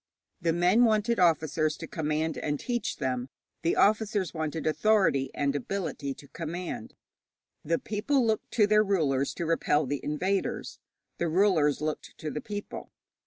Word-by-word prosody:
The 165 -1 +2
men 180 +8 +4
wanted 225 +1 +2
officers 155 -2 +2
to - - -6
command 155 0 -1
and 145 -1 -2
teach 240 -1 -2
them; 125 -1 -2 0.3
the 165 - +1
officers 210 -4 +2
wanted 160 0 -3
authority 155 -4 +2
and 140 0 0
ability 145 -3 -3
to 140 - -14
command. 170 -7 -5 0.7
The 165 +2 +1
people 235 - 0
looked 220 -1 0
to 215 - +5
their 210 +1 +4
rulers 145 -9 +1
to 170 - -3
repel 155 -2 +2
the 140 +2 -3
invaders; 185 +6 -2 0.4
the 170 - +1
rulers 160 -5 +3
looked 155 0 -4
to 155 - -5
the 150 - -4
people. 205 -1 -7
165 Hz, 150 wpm, -28 LUFS, 150-205 Hz, 0.7 s, to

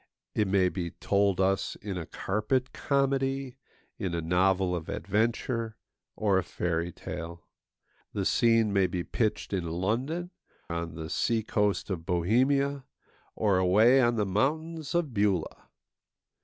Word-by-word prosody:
It 105 - +1
may 95 -1 +3
be 90 -2 -3
told 100 +1 +1
us 95 0 +1
in 100 -2 -6
a 85 -3 -5
carpet 110 +6 -1
comedy, 135 -1 0 0.4
in 95 -5 -2
a 85 - -1
novel 90 +2 +2
of 85 -2 -6
adventure, 115 +2 -1 0.4
or 100 -3 +2
a - - -2
fairy 85 0 -2
tale. 85 0 -7 0.7
The - - -2
scene 115 -3 +3
may 95 -2 +3
be 90 -1 -3
pitched 105 -1 -1
in 90 -3 -1
London, 125 - -2 0.4
on 85 -1 -4
the 80 -1 -5
sea 115 +7 0
coast 105 -1 0
of 85 -3 -3
Bohemia, 130 +10 +2 0.5
or 100 -4 +2
away 110 +8 +5
on 120 -1 +3
the 105 -2 +1
mountains 155 - -1
of 165 -7 0
Beulah. 100 -5 0
105 Hz, 140 wpm, -29 LUFS, 90-125 Hz, 0.7 s, away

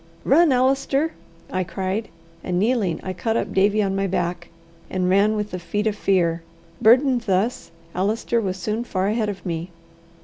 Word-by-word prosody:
"Run, 315 +3 +5
Allister!" 270 +4 +1 0.4
I 185 0 0
cried; 195 +4 -3 0.4
and 180 -1 -1
kneeling, 210 -3 +1
I 185 - -4
caught 225 +5 -1
up - - -2
Davie 205 +2 +3
on 195 -1 -1
my 195 0 0
back, 175 -1 -2 0.4
and 185 -1 -1
ran 205 +3 +4
with 210 0 -3
the 180 - -4
feet 205 +4 -3
of 215 -2 +1
fear. 175 -5 +1 0.4
Burdened 250 +2 +5
thus, 195 +6 0 0.2
Allister 220 +5 0
was 190 -3 -2
soon 215 +5 -2
far 190 -4 -1
ahead 215 -1 0
of 195 -4 -7
me. 170 0 -3
200 Hz, 170 wpm, -22 LUFS, 185-230 Hz, 0.4 s, Run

